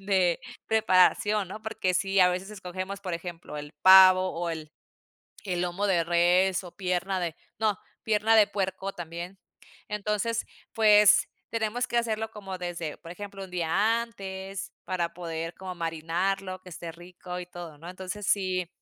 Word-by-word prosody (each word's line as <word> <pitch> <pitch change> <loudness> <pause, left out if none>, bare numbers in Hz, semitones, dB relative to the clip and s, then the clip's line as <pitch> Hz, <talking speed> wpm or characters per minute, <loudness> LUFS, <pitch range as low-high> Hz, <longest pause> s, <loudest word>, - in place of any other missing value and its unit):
de 190 -3 +2 0.3
preparación, 210 -1 +3
¿no? 215 +3 -7
Porque 195 -4 -1
si 195 +2 +1
a 180 - +7
veces 185 +2 -3
escogemos, 190 0 -6
por 185 -3 -5
ejemplo, 170 -2 -6
el 145 0 -8
pavo, 185 0 +8
o, 170 0 -3
el 155 -2 -6 0.8
el 180 -2 -1
lomo 180 +3 -1
de 175 -3 +3
res, 180 +3 +3
o, 175 - -11
pierna 185 0 -1
de 170 -3 -2 0.2
no, 215 -3 +1 0.3
pierna 220 +1 +3
de 215 -2 +7
puerco 195 0 -2
también. 175 +2 -7 0.5
Entonces, 210 +2 -1 0.3
pues, 210 -2 +6 0.2
tenemos 230 +2 -1
que 240 - -4
hacerlo 220 -1 -1
como 195 -3 -7
desde, 175 -3 -4
por 165 +1 -12
ejemplo, 195 +1 -8
1 180 - -16
día 200 +7 +2
antes 195 -4 -6
para 170 -2 -2
poder 165 -1 -5
como 185 -1 -7
marinarlo, 175 +3 -2
que 185 - -19
esté 170 -1 -7
rico 180 +1 -8
y 180 - -6
todo, 175 -4 -9
¿no? 165 +4 -9
Entonces 190 +2 -6
si 185 -3 +1
185 Hz, 160 wpm, -28 LUFS, 175-200 Hz, 0.8 s, pavo